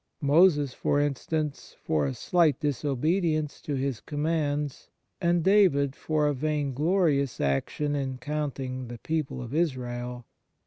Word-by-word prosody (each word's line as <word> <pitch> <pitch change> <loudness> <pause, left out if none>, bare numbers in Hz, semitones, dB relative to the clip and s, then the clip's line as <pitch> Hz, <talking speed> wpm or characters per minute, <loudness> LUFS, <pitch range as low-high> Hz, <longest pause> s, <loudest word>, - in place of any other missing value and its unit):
Moses, 145 -2 +4
for 145 - 0
instance, 145 +1 -2
for 75 -2 +1
a 65 - -3
slight 165 -6 +2
disobedience 150 +3 0
to 145 - -3
His 135 -3 -2
commands, 150 -2 -2 0.3
and 170 -1 +2
David 165 -9 +4
for 155 -1 0
a 145 - +2
vainglorious 150 +1 +1
action 75 - 0
in 135 -2 -2
counting 130 -2 -4
the 120 0 -7
people 150 -2 -3
of 120 +2 -8
Israel. 125 -6 -2
145 Hz, 125 wpm, -27 LUFS, 130-155 Hz, 0.3 s, Moses